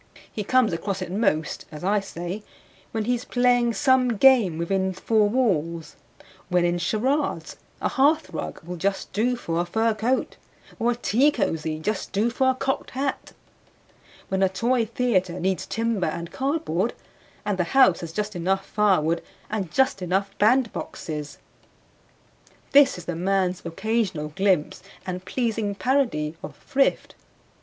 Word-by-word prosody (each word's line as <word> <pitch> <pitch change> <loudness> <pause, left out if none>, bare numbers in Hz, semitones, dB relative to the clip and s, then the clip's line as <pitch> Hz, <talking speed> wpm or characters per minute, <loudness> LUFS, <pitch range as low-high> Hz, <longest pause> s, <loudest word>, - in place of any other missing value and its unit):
He 210 - -4
comes 245 -2 +3
across 190 +2 -2
it 175 - -7
most 180 -6 0
(as 150 +1 -9
I 205 +3 +2
say) 185 +1 -6 0.5
when 220 -2 -2
he 245 - +2
is 245 0 -2
playing 245 -2 +2
some 260 -5 +3
game 230 -10 +5
within 190 +3 0
four 210 +2 +2
walls; 170 - 0 0.5
when 180 -1 +3
in 175 0 +1
charades, 255 - -1 0.2
a - - 0
hearthrug 280 - 0
will 175 +2 -6
just 195 +3 -2
do 240 +5 +1
for 170 -8 -2
a - - -2
fur 225 +5 +1
coat, 230 +5 -1 0.4
or 235 +1 +2
a 240 - +1
tea 245 +4 +3
cozy 160 - -1
just 195 +6 -3
do 215 +4 +1
for 260 +2 +2
a 260 - +2
cocked 270 +1 -2
hat; 275 0 -3 0.9
when 190 0 -1
a 190 - +4
toy 230 +4 +1
theater 190 -8 0
needs 190 +1 -1
timber 225 -5 -1
and 170 +2 -4
cardboard, 265 - -1 0.5
and 205 -2 -1
the 175 - +2
house 260 -10 +6
has 170 -2 -6
just 210 +3 -3
enough 190 +3 0
firewood 180 -6 +2 0.3
and 200 -5 -2
just 265 -7 +2
enough 195 +2 -1
bandboxes. 205 - 0 1.3
This 280 -4 +6
is 175 - -9
the 175 - -3
man's 185 +1 0
occasional 190 -3 -1
glimpse 185 -1 0 0.2
and 185 -1 -4
pleasing 220 -2 -1
parody 195 - 0
of 145 - -8
thrift. 270 - 0
200 Hz, 150 wpm, -24 LUFS, 175-240 Hz, 1.3 s, house